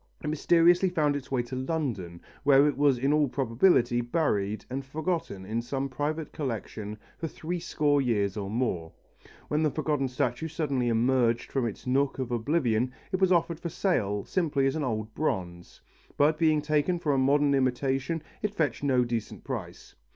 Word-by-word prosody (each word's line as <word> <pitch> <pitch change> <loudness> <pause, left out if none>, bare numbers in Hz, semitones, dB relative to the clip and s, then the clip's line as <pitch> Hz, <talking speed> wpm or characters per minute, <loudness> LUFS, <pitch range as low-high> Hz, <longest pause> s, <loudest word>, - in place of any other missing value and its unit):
It - - -3
mysteriously 175 +4 +4
found 150 -5 +1
its 140 -2 -6
way 130 -3 0
to 120 +2 -7
London, 130 - -3 0.2
where 140 0 +5
it 145 - 0
was 140 -2 +3
in 135 +4 +1
all 150 -1 +3
probability 120 -1 +2
buried 110 -7 -1
and 135 +2 -4
forgotten 150 - -3
in 110 +4 -2
some 135 +3 -3
private 150 +4 -3
collection 110 -5 -5 0.2
for 165 - -2
three 170 +3 -4
score 150 -4 +1
years 105 -6 0
or 100 -2 -4
more. 100 -8 -2 0.6
When 150 +1 0
the 155 - +3
forgotten 150 -2 -1
statue 130 +2 -1
suddenly 145 -6 -1
emerged 120 0 +2
from 130 -3 0
its 105 - -7
nook 135 +2 +1
of 130 -2 -3
oblivion 120 -1 +1 0.2
it 190 0 -1
was 190 -1 +4
offered 170 -2 +2
for 170 - -4
sale 105 - 0
simply 150 -7 0
as 135 - +1
an 155 - -1
old 110 -4 -3
bronze, 90 - -3 0.4
but 155 +2 +3
being 155 -2 +3
taken 155 +3 +1
for 155 -4 0
a 135 - +2
modern 140 +2 +3
imitation 135 +4 0 0.2
it 210 0 -2
fetched 150 -9 0
no 130 -3 +3
decent 120 -2 -4
price. - - -6
135 Hz, 175 wpm, -28 LUFS, 120-155 Hz, 0.6 s, where